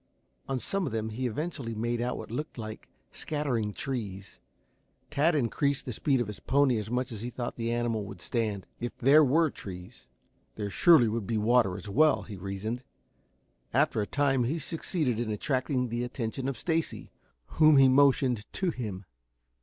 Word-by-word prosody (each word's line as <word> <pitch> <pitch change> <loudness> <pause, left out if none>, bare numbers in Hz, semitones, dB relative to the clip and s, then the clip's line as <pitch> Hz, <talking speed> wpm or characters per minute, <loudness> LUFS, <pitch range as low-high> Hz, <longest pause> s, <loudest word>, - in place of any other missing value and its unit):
On 135 - 0
some 195 +7 -2
of - - -4
them 110 0 -2
he 125 +4 -2
eventually 135 -2 -4
made 120 +2 -1
out 125 +1 -1
what 110 - -8
looked 150 +5 -5
like 110 -1 -7 0.2
scattering 130 -9 -2
trees. 105 -6 -5 0.7
Tad 150 +3 +3
increased 140 +1 0
the 125 - -4
speed 135 +4 +1
of 120 - 0
his 105 -1 -8
pony 135 -3 +3
as 105 0 -6
much 125 +1 -1
as 110 -3 -6
he 120 - -4
thought 120 -1 -5
the 115 0 -2
animal 120 -2 0
would 100 -2 -9
stand. 105 -1 -2
If 120 - -5
there 145 +5 +6
were 155 +3 +3
trees, 90 -10 -10 0.5
there 105 -2 -4
surely 165 - +6
should 110 -1 -2
be 115 -1 0
water 110 -3 +3
as 100 - -9
well, 155 +10 +3
he 105 - -8
reasoned. 100 +5 -4 0.9
After - - +3
a 105 - -2
time 135 -3 +2
he 145 +8 -1
succeeded 155 - -1
in 120 -2 -2
attracting 125 +3 -1
the 120 +1 -2
attention 125 +1 -3
of 135 - -4
Stacy, 165 +4 -2 0.5
whom 155 -2 +7
he 135 -1 +8
motioned 130 -4 +3
to 185 -2 0
him. 105 - -5
120 Hz, 175 wpm, -29 LUFS, 110-140 Hz, 0.9 s, he